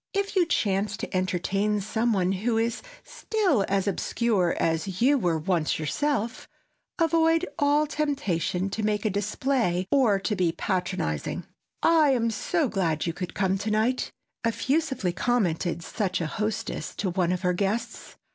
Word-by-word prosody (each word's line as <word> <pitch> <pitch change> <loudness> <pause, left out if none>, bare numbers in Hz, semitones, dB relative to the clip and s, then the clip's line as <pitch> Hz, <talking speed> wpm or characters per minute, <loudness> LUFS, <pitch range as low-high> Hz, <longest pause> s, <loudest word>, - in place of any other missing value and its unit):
If 400 0 -1
you 360 -3 +4
chance 200 - 0
to - - -5
entertain 195 +3 0
some 220 +4 0
one 190 -3 +1
who 220 +4 0
is 230 0 0 0.2
still 380 - 0
as 195 0 0
obscure 200 -3 +1
as 165 +3 -1
you 270 +5 +5
were 175 -5 +1
once 160 0 0
yourself, 235 - -1 0.5
avoid 330 0 +3
all 290 +1 +3
temptation 200 - -1
to 220 - -2
make 210 0 0
a 215 - +2
display 205 -2 0
or 245 -8 +4
to 210 +2 -1
be 175 -3 +1
patronizing. 180 - -2 0.4
"I 315 -4 +5
am 230 -2 +1
so 315 +7 0
glad 170 -8 0
you 170 - -1
could 180 +1 -6
come 190 -1 +1
to 210 +2 -2
night," 220 +4 +1 0.3
effusively 260 - 0
commented 175 -6 0
such 190 -1 -2
a 165 - -1
hostess 215 +6 -3
to 190 -3 -1
one 180 -1 +1
of 180 0 -1
her 180 0 +2
guests. 210 +6 -3
210 Hz, 155 wpm, -26 LUFS, 185-255 Hz, 0.5 s, you